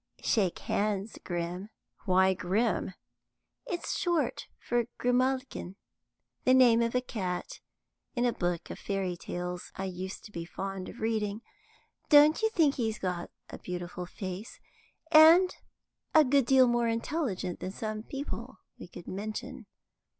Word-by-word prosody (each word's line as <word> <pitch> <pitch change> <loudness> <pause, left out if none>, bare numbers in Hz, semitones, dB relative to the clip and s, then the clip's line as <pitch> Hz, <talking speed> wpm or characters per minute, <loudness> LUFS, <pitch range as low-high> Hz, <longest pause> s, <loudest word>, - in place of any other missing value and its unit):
Shake 195 -6 +2
hands, 205 0 -2
Grim." 175 +3 -4 0.4
"Why 190 -1 +4
Grim?" 190 +1 0 0.7
"It's 345 - -3
short 345 -5 0
for 240 -1 -1
Grimalkin. 255 -5 0 0.7
The 255 - +5
name 240 -3 +6
of 230 +1 0
a 250 - +3
cat 185 -8 -4 0.6
in 240 0 +1
a 240 - +2
book 175 -2 -2
of - - -7
fairy 195 -3 -2
tales 180 +1 -5
I 195 - -3
used 190 +1 -6
to 210 - -11
be 170 -4 -5
fond 190 +2 -5
of 240 - -11
reading. 220 -1 -1 0.7
Don't 300 +3 +7
you 445 - +3
think 320 -9 +3
he's 220 -3 -1
got 180 -2 -3 0.2
a - - -8
beautiful 180 0 -5
face, 190 +4 -7 0.5
and 330 +4 +8 0.6
a 310 -1 +8
good 270 -1 +3
deal 265 0 +6
more 240 -1 +2
intelligent 230 - -2
than - - -4
some 215 +2 -4
people 275 +5 -6 0.2
we - - -9
could 175 - -11
mention? 215 +5 -6
215 Hz, 140 wpm, -30 LUFS, 185-255 Hz, 0.7 s, and